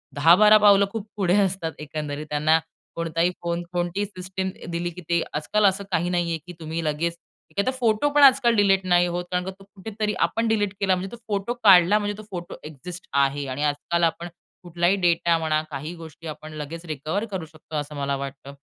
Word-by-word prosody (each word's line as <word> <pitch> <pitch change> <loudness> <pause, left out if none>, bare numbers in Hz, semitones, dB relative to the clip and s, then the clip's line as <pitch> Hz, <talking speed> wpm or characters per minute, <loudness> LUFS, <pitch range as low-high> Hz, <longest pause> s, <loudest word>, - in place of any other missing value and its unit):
10-12 180 +9 +7
पावलं 200 -1 +6
खूप 220 -1 -5
पुढे 185 -2 +2
असतात 190 -4 -1
एकंदरीत, 150 0 -5
त्यांना 155 +2 +3 0.4
कोणताही 165 +1 0
फोन, 170 0 -2
कोणतीही 175 +3 -1
सिस्टम 190 -1 -5 0.2
दिली 170 +1 -2
की 175 +1 -10
ते, 170 -1 +2
आजकाल 205 +8 +1
असं 195 0 +2
काही 175 0 +1
नाहीये 175 -2 0
की 180 - -8
तुम्ही 160 +1 -4
लगेच, 165 +3 -1 0.3
एखादा 200 +6 0
फोटो 245 +1 +1
पण 290 0 +5
आजकाल 260 -3 +6
डिलीट 195 -2 +3
नाही 175 -1 +4
होत. 175 0 -3
कारण 180 0 -1
तो 195 +1 -12
कुठेतरी 210 +2 -4
आपण 230 0 -2
डिलीट 205 -3 +1
केला 195 -2 +2
म्हणजे, 185 +1 -5
तो 235 - -8
फोटो 205 +2 -1
काढला 195 0 +7
म्हणजे 205 0 -3
तो 215 - -9
फोटो 175 -1 -6
एक्झिस्ट 170 +5 -10
आहे. 140 0 +1
आणि 130 +3 -3
आजकाल 150 +4 0
आपण 170 +1 0 0.4
कुठलाही 175 +2 +1
डेटा 170 -1 +3
म्हणा, 155 -1 0
काही 150 +4 -5
गोष्टी 165 0 -11
आपण 155 0 -8
लगेच 155 +3 -7
रिकव्हर 155 +7 -3
करू 185 -4 -4
शकतो 155 0 -12
असं 150 0 -5
मला 140 -1 -1
वाटतं. 140 0 -7
175 Hz, 190 wpm, -24 LUFS, 155-200 Hz, 0.4 s, 10-12